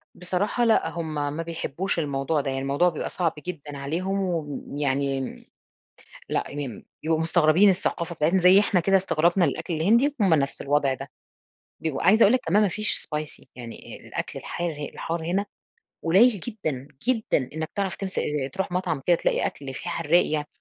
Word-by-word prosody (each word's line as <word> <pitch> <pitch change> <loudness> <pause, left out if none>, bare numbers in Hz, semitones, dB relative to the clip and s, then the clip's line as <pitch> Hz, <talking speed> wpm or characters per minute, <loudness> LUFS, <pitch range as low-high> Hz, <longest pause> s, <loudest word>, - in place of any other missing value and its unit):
بصراحة 185 +6 -1
لأ، 220 -7 +3
هُم 165 -1 -5 0.2
ما 165 - -3
بيحبوش 170 +2 -2
الموضوع 145 0 0
ده، 135 - -3
يعني 135 0 -2
الموضوع 140 +6 +2
بيبقى 160 - -4
صعب 170 -3 0
جدًا 145 -4 -6
عليهم 175 +8 -2
وم 155 -6 -3
يعني 140 -1 0
م 130 - -7 0.8
لأ، - - 0
يم 140 -6 -6 0.2
يبقوا 160 +1 +1
مستغربين 165 +3 +4
الثقافة 170 -2 -1
بتاعتنا 165 +4 +2
زي 185 +2 +7
إحنا 200 -3 +2
كده 195 +3 +3
استغرابنا 175 0 +2
الأكل 170 - -2
الهندي، 235 - +3
هُم 185 -5 +5
نفس 140 -2 -1
الوضع 140 -1 +2
ده، 135 0 -9 0.7
بيبقوا 155 -4 -2
عايزة 215 +4 +5
أقول 205 - +7
لك 255 - +3
كمان 205 +6 +4
ما 205 - +3
فيش 210 +3 0
spicy 150 -1 -5
يعني 120 -2 -9
الأكل - - -4
الحار 175 0 -3 0.2
الحار 165 0 -4
هنا 195 +4 0 0.6
قليّل 190 +9 +6
جدًا، 155 - -4 0.2
جدًا، 220 - +1
إنك 160 0 -4
تعرف 195 -3 -2
تمس 195 -1 -3 0.3
تروح 190 -1 -3
مطعم 175 -5 -1
كده 175 - +5
تلاقي - - 0
أكل 135 -2 -6
في - - -6
حرّاق 165 +2 +2
يعني، 150 -1 -1
165 Hz, 170 wpm, -25 LUFS, 145-190 Hz, 0.8 s, زي